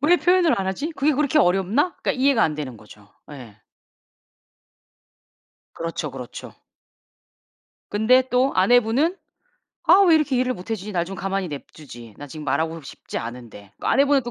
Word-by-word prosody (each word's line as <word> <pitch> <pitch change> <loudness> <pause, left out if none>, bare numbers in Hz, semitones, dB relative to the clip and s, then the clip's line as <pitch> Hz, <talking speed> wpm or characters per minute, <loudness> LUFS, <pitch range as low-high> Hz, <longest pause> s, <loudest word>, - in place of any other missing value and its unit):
'왜 320 +5 +4
표현을 355 - +3
안 190 - -2
하지? 280 - -3
그게 295 +2 +1
그렇게 295 +1 +1
어렵나?' 200 - +2
그러니까 - - +1
이해가 260 -3 +2
안 155 - +1
되는 140 -5 -6
거죠. 105 -1 -17 0.2
네. 125 -8 -12 2.2
그렇죠, 165 -3 -5
그렇죠. 125 -2 -9 1.4
근데 225 +5 +3
또 255 +2 +2
아내분은 245 - +3 0.7
'아 365 +4 +7
왜 335 - +6
이렇게 300 -4 +1
이해를 255 0 0
못 180 +2 -11
해 - - +1
주지? 210 0 -8
나 175 -3 0
좀 195 +2 -8
가만히 195 0 -3
냅두지. 135 -6 -11
나 145 - -8
지금 150 +2 -9
말하고 160 +4 -1
싶지 135 - -7
않은데.' 115 -4 -9
그 - - -5
아내분은 280 0 +3
또 240 - -6
195 Hz, 325 characters per minute, -22 LUFS, -, 2.2 s, 아